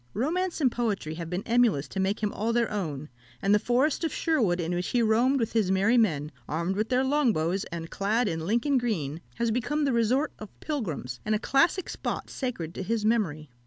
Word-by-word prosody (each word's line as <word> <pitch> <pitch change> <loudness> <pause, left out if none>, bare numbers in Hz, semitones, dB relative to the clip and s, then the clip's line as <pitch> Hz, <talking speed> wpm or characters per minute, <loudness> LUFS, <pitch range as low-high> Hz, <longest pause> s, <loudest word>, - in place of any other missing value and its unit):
Romance 340 - -1
and 265 -5 +3
poetry 210 -10 -2
have 165 0 -6
been 180 +3 -3
emulous 230 - +2
to 195 - -5
make 195 +3 0
him 210 -1 -1
all 220 +3 -1
their 235 -1 +1
own; 155 -8 -3 0.3
and 200 - +2
the 210 - +5
forest 260 +9 +1
of 325 - 0
Sherwood, 230 - +1
in 170 +1 -1
which 180 +1 -1
he 245 - +1
roamed 240 +5 +3
with 230 -2 -1
his 220 -5 +2
merry 195 +5 +3
men, 155 -11 +2 0.2
armed 170 +5 -1
with 215 +2 -1
their 255 +1 +2
long 270 -3 +2
bows, 170 +4 -1
and 165 -1 -7
clad 215 +4 +1
in 165 -4 -1
Lincoln 240 - +2
green, 165 - -2
has 235 0 0
become 290 +6 0
the 275 - +1
resort 245 +6 +1
of 215 -2 -11
pilgrims, 165 - -4
and 215 0 +1
a - - 0
classic 325 - +2
spot - - -4
sacred 205 - -4
to - - -5
his 215 +2 -1
memory. 160 - 0
215 Hz, 215 wpm, -27 LUFS, 175-250 Hz, 0.3 s, the